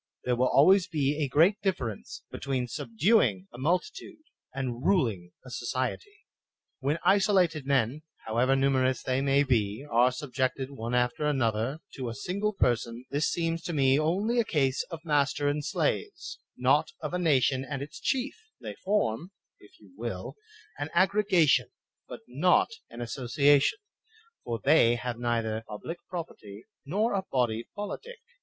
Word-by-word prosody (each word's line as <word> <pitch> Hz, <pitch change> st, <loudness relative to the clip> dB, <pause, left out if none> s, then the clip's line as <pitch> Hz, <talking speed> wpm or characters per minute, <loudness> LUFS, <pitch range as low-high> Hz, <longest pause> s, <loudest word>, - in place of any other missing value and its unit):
There 125 Hz, -, +1 dB
wUl 125 Hz, +2 st, +2 dB
always 185 Hz, +8 st, +5 dB
be 150 Hz, -2 st, 0 dB
a -, -, 0 dB
great 170 Hz, +10 st, +3 dB
difference 125 Hz, -, -3 dB
between 130 Hz, -2 st, -2 dB
subduing 120 Hz, -, +1 dB
a 120 Hz, -, -10 dB
multitude 310 Hz, -, -2 dB, 0.3 s
and 130 Hz, -2 st, -4 dB
ruling 110 Hz, -, +1 dB
a 125 Hz, -, -10 dB
society. 130 Hz, -, -4 dB, 0.5 s
When 140 Hz, +4 st, 0 dB
isolated 185 Hz, -7 st, +3 dB
men, 135 Hz, +1 st, +1 dB, 0.2 s
however 120 Hz, +4 st, +2 dB
numerous 130 Hz, -1 st, +1 dB
they 130 Hz, +1 st, 0 dB
may 140 Hz, +1 st, +3 dB
be, 115 Hz, -1 st, 0 dB
are 120 Hz, +2 st, +4 dB
subjected 130 Hz, 0 st, -2 dB
one 120 Hz, -2 st, -4 dB
after 125 Hz, +5 st, +1 dB
another 130 Hz, +1 st, 0 dB, 0.2 s
to 130 Hz, -3 st, -3 dB
a 115 Hz, -, -6 dB
single 200 Hz, -, -2 dB
person, 120 Hz, -, -1 dB
this 145 Hz, +3 st, +1 dB
seems 165 Hz, 0 st, -1 dB
to 170 Hz, -, -3 dB
me 135 Hz, -1 st, +3 dB
only 200 Hz, +10 st, +1 dB
a -, -, +4 dB
case 140 Hz, -9 st, +1 dB
of 165 Hz, -2 st, -8 dB
master 145 Hz, -1 st, +1 dB
and 145 Hz, +1 st, 0 dB
slaves, 415 Hz, -, -2 dB, 0.2 s
not -, -, +3 dB
of -, -, -4 dB
a 180 Hz, -, 0 dB
nation 135 Hz, -5 st, +2 dB
and 140 Hz, 0 st, -4 dB
its 145 Hz, -, -10 dB
chief; 265 Hz, +1 st, -1 dB, 0.3 s
they -, -, -7 dB
form, 180 Hz, -, -1 dB, 0.3 s
if 105 Hz, -, -20 dB
you 100 Hz, -4 st, -19 dB
will, 110 Hz, -4 st, -5 dB, 0.4 s
an 145 Hz, +1 st, -3 dB
aggregation, 190 Hz, -3 st, +3 dB, 0.4 s
but -, -, -9 dB
not 145 Hz, +9 st, +3 dB, 0.2 s
an 120 Hz, +1 st, -9 dB
association, 140 Hz, -, +2 dB, 0.7 s
for 115 Hz, -1 st, -3 dB
they 135 Hz, -5 st, +5 dB
have 120 Hz, 0 st, -4 dB
neither 115 Hz, -2 st, -1 dB
public 165 Hz, +11 st, -7 dB
property 110 Hz, -, -8 dB, 0.2 s
nor 210 Hz, +9 st, 0 dB
a 195 Hz, -1 st, 0 dB
body 120 Hz, -3 st, 0 dB
politic. 205 Hz, -, -6 dB
140 Hz, 150 wpm, -28 LUFS, 120-170 Hz, 0.7 s, always